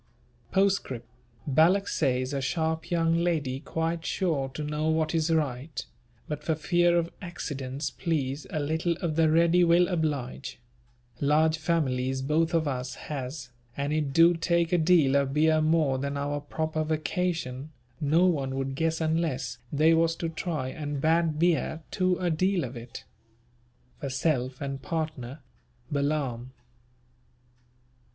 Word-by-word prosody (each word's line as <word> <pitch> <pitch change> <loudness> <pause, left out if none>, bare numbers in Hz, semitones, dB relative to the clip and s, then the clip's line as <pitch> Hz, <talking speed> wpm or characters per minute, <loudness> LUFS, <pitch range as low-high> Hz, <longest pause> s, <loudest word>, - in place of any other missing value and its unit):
Poscrip. 190 -11 +1 0.4
Balak 165 +8 +4
says 130 -2 0
a 140 - -1
sharp 160 +3 -1
young 165 -1 +2
lady 145 -7 0
quite 165 +2 -2
sure 155 -9 -1
to 130 +3 -6
know 150 +1 -1
what 160 0 +1
is 160 0 +1
right, 150 -2 -1 0.4
but 150 0 -5
for 160 - 0
fear 175 +2 +2
of 170 0 0
accidents 140 -6 -4
please 145 -4 -2
a 155 - -2
little 160 +4 0
of 165 -2 -3
the 160 -1 +4
ready 170 +2 +4
will 175 +1 +5
oblige, 150 -11 -2 0.6
large 155 +2 +3
families 130 -5 0
both 160 +4 +1
of 160 -2 +2
us 130 -1 -3
has 130 -2 -6 0.3
and 140 +1 -1
it 150 -3 0
do 165 +4 +6
take 170 0 +1
a 175 - +4
deal 155 -5 +4
of 140 0 +1
beer 155 +1 +4
more 155 -4 +2
than 140 +1 -2
our 145 +1 -2
proper 155 +2 -2
vacation 155 -3 -2 0.3
no 160 +4 +3
one 140 -7 0
would 135 0 -2
guess 160 +3 -1
unless 160 -6 -1
they 155 +3 +4
was 165 0 +3
to 165 - -3
try 155 -5 -3
and 145 0 -4
bad 160 +1 +2
beer 165 -1 +1
too 185 -1 +1
a 175 -2 0
deal 185 +2 +1
of 125 0 -6
it. 115 0 -9 1.0
For 140 - -4
self 130 -1 -1
and 140 -1 -4
partner. 155 -3 -4 0.5
BALAAM." 140 -4 -1
155 Hz, 145 wpm, -27 LUFS, 140-165 Hz, 1.0 s, do